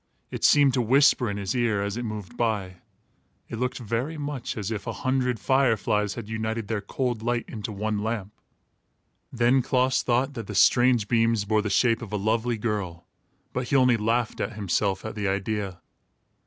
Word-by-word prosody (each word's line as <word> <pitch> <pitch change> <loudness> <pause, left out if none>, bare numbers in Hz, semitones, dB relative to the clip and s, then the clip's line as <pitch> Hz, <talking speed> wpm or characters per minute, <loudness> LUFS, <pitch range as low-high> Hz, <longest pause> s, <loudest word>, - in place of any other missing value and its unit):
It - - -6
seemed 145 -3 +5
to 125 - +2
whisper 125 0 +4
in 100 - -3
his 100 +3 -3
ear, 115 -5 +1
as 100 0 -3
it 120 - -3
moved 110 0 -6
by. 105 -6 -1 0.7
It 115 - -5
looked 125 0 -1
very 120 +7 -3
much 145 -5 -4
as 105 0 -3
if 110 - -4
a - - -1
hundred 125 -3 +1
fire 130 -4 +3
flies 105 0 -1
had 115 -3 -7
united 110 0 -3
their 110 -2 -2
cold 120 +2 -2
light 120 +1 -1
into 110 -1 -6
one 105 +1 -2
lamp. 105 -2 -3 1.0
Then 125 +2 +3
Klaas 130 0 +1
thought 130 +3 0
that 115 -5 -6
the 105 - -6
strange 120 0 +4
beams 115 -2 +2
bore 110 +1 +2
the 105 - -3
shape 115 +3 +2
of 115 - -8
a 105 - -1
lovely 110 +3 0
girl, 100 -6 -3 0.5
but 125 -1 -2
he - - 0
only 125 -2 +5
laughed 115 +2 -1
at 105 - -2
himself 100 -1 -1
at 110 - -4
the 105 -2 -2
idea. 100 -1 -2
115 Hz, 190 wpm, -26 LUFS, 105-125 Hz, 1.0 s, seemed